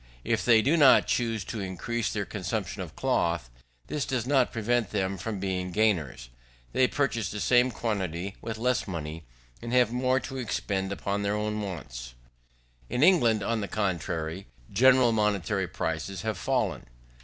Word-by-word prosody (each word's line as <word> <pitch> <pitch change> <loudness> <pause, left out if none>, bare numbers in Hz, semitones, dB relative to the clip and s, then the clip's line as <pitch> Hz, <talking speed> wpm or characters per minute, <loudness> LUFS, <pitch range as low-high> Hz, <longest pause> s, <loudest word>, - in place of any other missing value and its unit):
If - - 0
they 115 -2 +5
do 150 +8 +3
not 145 -4 +7
choose 115 -3 0
to 110 - -5
increase 100 +5 -2
their - - -2
consumption - - -4
of - - -8
cloth, 85 -8 0 0.3
this 150 - -2
does 120 -1 -2
not 130 -2 +3
prevent 115 -1 0
them 95 -2 -1
from 100 +2 -4
being 90 -1 -2
gainers. 85 - 0 0.4
They 130 - +4
purchase 120 -8 -1
the 105 - -5
same 125 +4 +4
quantity 100 -5 -3
with 115 -1 -5
less 125 0 0
money, 80 -3 -5 0.4
and 120 - -5
have 125 -3 +4
more 130 +1 +2
to 135 - -6
expend 100 -5 -2
upon 100 +1 -2
their 100 +1 0
other 105 0 -2
wants. 65 - -6 0.7
In 125 - +1
England, 120 - +4
on 115 +1 0
the 100 - -3
contrary, 90 -3 -2 0.3
general 130 +2 +5
money 105 -2 +2 0.3
prices 80 +4 -3
have 110 -1 -1
fallen. 65 - -1
105 Hz, 160 wpm, -28 LUFS, 95-120 Hz, 0.7 s, not